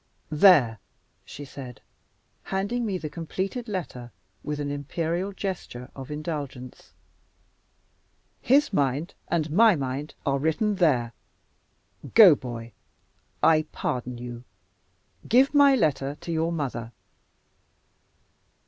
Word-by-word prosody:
"There!" 150 - +5 0.4
she 145 - -9
said, 130 -4 -10 0.6
handing 210 +5 -2
me 195 -3 -1
the 160 - -5
completed 190 - -4
letter 150 - -5 0.3
with 150 0 -4
an 145 -1 -3
imperial 165 +6 -2
gesture 185 -11 -6
of 135 0 -8
indulgence. 145 -5 -6 1.5
"His 280 0 +3
mind 145 +3 0
and 160 -3 -1
my 215 +4 +6
mind 140 +1 -4
are 140 -1 +1
written 190 +8 0
there. 125 -10 +2 1.0
Go, 210 -7 +10
boy. 120 -4 -6 0.7
I 155 -1 +4
pardon 125 -1 -3
you. 120 0 -8 0.9
Give 260 +5 +5
my 285 -2 +6
letter 145 - 0
to 170 - -5
your 165 +1 0
mother." 125 -7 -4
155 Hz, 105 wpm, -26 LUFS, 130-190 Hz, 1.5 s, Go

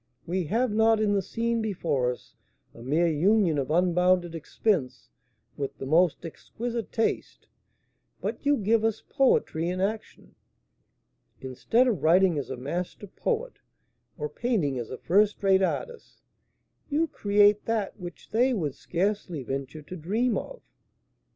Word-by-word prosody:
We 180 +1 -1
have 230 +8 0
not 220 +1 +3
in 210 -1 +2
the 200 - +2
scene 230 +4 -1
before 160 - 0
us 125 - -11 0.4
a - - -13
mere 150 +8 +1
union 170 0 +3
of 135 - -3
unbounded 180 +1 +2
expense 165 - -2 0.5
with 140 -1 -5
the - - -6
most 170 +4 +2
exquisite 230 +7 -5
taste, 225 - -2 0.7
but - - -4
you 285 0 +3
give 220 +2 +2
us 225 -1 -1
poetry 175 - +1
in 180 +1 -3
action. 210 +3 -4 1.1
Instead 180 - +1
of 210 - 0
writing 175 -1 +4
as 140 - -6
a 130 - -5
master 170 +10 -4
poet, 470 - -3 0.6
or 150 -2 -3
painting 150 - -1
as 115 - -6
a 130 - -6
first 205 +4 +2
rate 190 -1 +4
artist, 475 - -4 0.7
you 315 +3 +1
create 205 -4 +3
that 220 -3 -2
which 175 -2 -10
they 250 +3 +3
would 155 - -2
scarcely 180 -2 -2
venture 135 +4 -5
to 180 - -8
dream 215 +8 0
of." - - -6
190 Hz, 145 wpm, -27 LUFS, 160-225 Hz, 1.1 s, writing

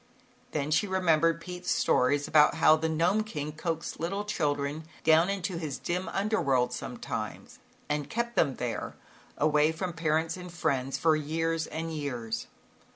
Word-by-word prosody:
Then 150 -3 -2
she 205 +7 +3
remembered 165 -3 +2
Pete's 180 +1 -6
stories 140 +3 +2
about 150 -1 +5
how 155 - +6
the 160 +1 -1
Gnome 175 +7 +2
King 150 -8 -5
coaxed 165 +1 -4
little 195 +5 -2
children 145 -5 -1 0.2
down 160 +3 +5
into 190 -3 -2
his 150 -5 -4
dim 180 +2 -3
under 215 +3 0
world 130 -3 +2
sometimes - - -6 0.3
and 150 -1 -2
kept 235 +1 -2
them 135 - +2
there, 120 -3 -4 0.4
away 150 +1 +3
from 175 +2 -4
parents 160 +1 0
and 180 -1 -8
friends 135 -5 -1
for 160 -1 +3
years 165 +2 -1
and 165 +1 -4
years. 125 -7 -4
160 Hz, 155 wpm, -29 LUFS, 150-175 Hz, 0.4 s, how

